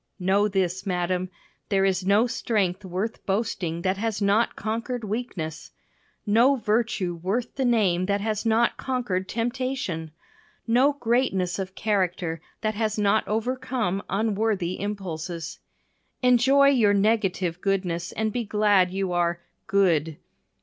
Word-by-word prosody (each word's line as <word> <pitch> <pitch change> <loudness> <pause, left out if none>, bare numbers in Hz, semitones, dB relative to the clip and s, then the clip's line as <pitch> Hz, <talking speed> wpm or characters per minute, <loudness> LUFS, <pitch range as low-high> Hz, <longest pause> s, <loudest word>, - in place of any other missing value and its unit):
Know 195 +2 +2
this, 190 -2 -1
madam, 180 0 -1 0.4
there 195 -1 +2
is 190 -1 +1
no 205 +4 +5
strength 205 -5 -1
worth 190 +5 -4
boasting 185 -5 -1
that 190 0 +1
has 220 0 -2
not 205 +3 +2
conquered 230 +3 -3
weakness. 200 -8 -4 0.6
No 235 +6 +4
virtue 215 -5 0
worth 195 +8 -2
the 265 - -1
name 190 -7 +2
that 200 0 +1
has 215 0 -2
not 230 +1 +2
conquered 235 -8 -2
temptation. 235 -8 -2 0.6
No 255 +5 +4
greatness 230 -9 0
of 190 0 -5
character 180 -6 -1 0.2
that 215 0 0
has 215 0 -1
not 210 +1 +2
overcome 225 -3 -1
unworthy 205 -3 0
impulses. 175 -5 -5 0.6
Enjoy 265 +3 +5
your 220 -7 +4
negative 195 -4 +1
goodness 185 -3 -1
and 220 0 -1
be 245 - -1
glad 205 -3 +3
you 190 0 -2
are 175 -1 0 0.3
"good." 165 -7 +2
200 Hz, 130 wpm, -25 LUFS, 185-230 Hz, 0.6 s, no